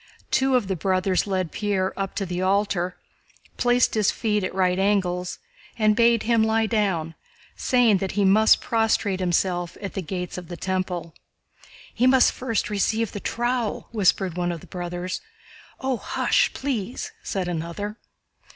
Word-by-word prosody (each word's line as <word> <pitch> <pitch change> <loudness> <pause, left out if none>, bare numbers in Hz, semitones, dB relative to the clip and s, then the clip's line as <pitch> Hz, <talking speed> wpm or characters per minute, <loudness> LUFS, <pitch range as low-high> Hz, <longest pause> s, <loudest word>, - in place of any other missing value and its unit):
Two 265 0 +3
of 240 -6 +1
the 190 - -1
brothers 185 +2 +1
led 185 -4 -1
Pierre 200 -3 -1
up 195 -1 -4
to 200 - -1
the 180 0 -3
altar, 185 -2 0 0.6
placed 245 0 +3
his 215 -3 +2
feet 210 -2 0
at 185 - -2
right 185 -1 +2
angles, 185 -3 0 0.4
and 215 -1 +3
bade 235 0 +4
him 230 0 +3
lie 220 0 +2
down, 195 -8 0 0.4
saying 245 -5 +3
that 190 0 -3
he 200 0 +2
must 215 +3 +5
prostrate 225 -4 +1
himself 175 -1 0
at 200 -1 -6
the 195 - -3
Gates 180 +1 -5
of 175 - -11
the 175 - -7
Temple. 185 -3 -3 0.8
"He 250 - +2
must 260 -1 +5
first 230 -5 -2
receive 210 +2 0
the 205 - -5
trowel," 240 0 -2
whispered 190 -4 +1
one 175 0 0
of 170 -2 -6
the - - -12
brothers. 175 0 -5 0.6
"Oh, 265 -1 -1
hush, - - +1
please!" 250 -4 -3
said 190 -2 -3
another. 175 +5 -4
195 Hz, 160 wpm, -24 LUFS, 180-220 Hz, 0.8 s, must